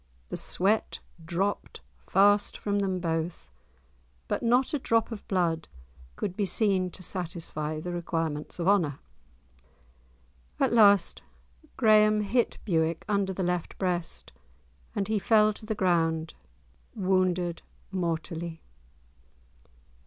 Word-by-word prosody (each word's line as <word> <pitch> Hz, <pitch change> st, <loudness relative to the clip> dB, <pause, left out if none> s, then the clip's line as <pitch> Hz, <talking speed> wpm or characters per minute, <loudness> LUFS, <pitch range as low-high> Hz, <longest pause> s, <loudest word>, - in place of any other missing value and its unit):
The -, -, -4 dB
sweat 205 Hz, +4 st, 0 dB, 0.3 s
dropped 180 Hz, -, -2 dB, 0.3 s
fast 205 Hz, +1 st, +4 dB
from 205 Hz, -1 st, -1 dB
them 190 Hz, -2 st, -1 dB
both, 165 Hz, -, -3 dB, 0.8 s
but -, -, -1 dB
not 245 Hz, +4 st, +2 dB
a 295 Hz, -, +1 dB
drop 230 Hz, -2 st, +1 dB
of 225 Hz, -, -8 dB
blood 170 Hz, -4 st, 0 dB, 0.5 s
could 185 Hz, -, -3 dB
be 210 Hz, -, -1 dB
seen 190 Hz, -1 st, +2 dB
to 185 Hz, -, -12 dB
satisfy 160 Hz, -4 st, -4 dB
the 175 Hz, +3 st, -5 dB
requirements 165 Hz, -3 st, -3 dB
of 175 Hz, 0 st, -2 dB
honour. 170 Hz, -9 st, +3 dB, 1.6 s
At -, -, +2 dB
last 205 Hz, -5 st, +5 dB, 0.6 s
Graeme 215 Hz, -2 st, +5 dB
hit 225 Hz, +4 st, 0 dB
Bewick 165 Hz, -4 st, 0 dB
under 200 Hz, -2 st, +1 dB
the 190 Hz, 0 st, -3 dB
left 180 Hz, -1 st, -2 dB
breast, 175 Hz, -3 st, -3 dB, 0.6 s
and 200 Hz, -, -1 dB
he 215 Hz, -1 st, +1 dB
fell 215 Hz, 0 st, +4 dB
to 215 Hz, -, -11 dB
the 220 Hz, -, -1 dB
ground 165 Hz, -4 st, +1 dB, 0.6 s
wounded 185 Hz, -3 st, +1 dB, 0.3 s
mortally. 170 Hz, -2 st, -3 dB
185 Hz, 115 wpm, -28 LUFS, 170-205 Hz, 1.6 s, last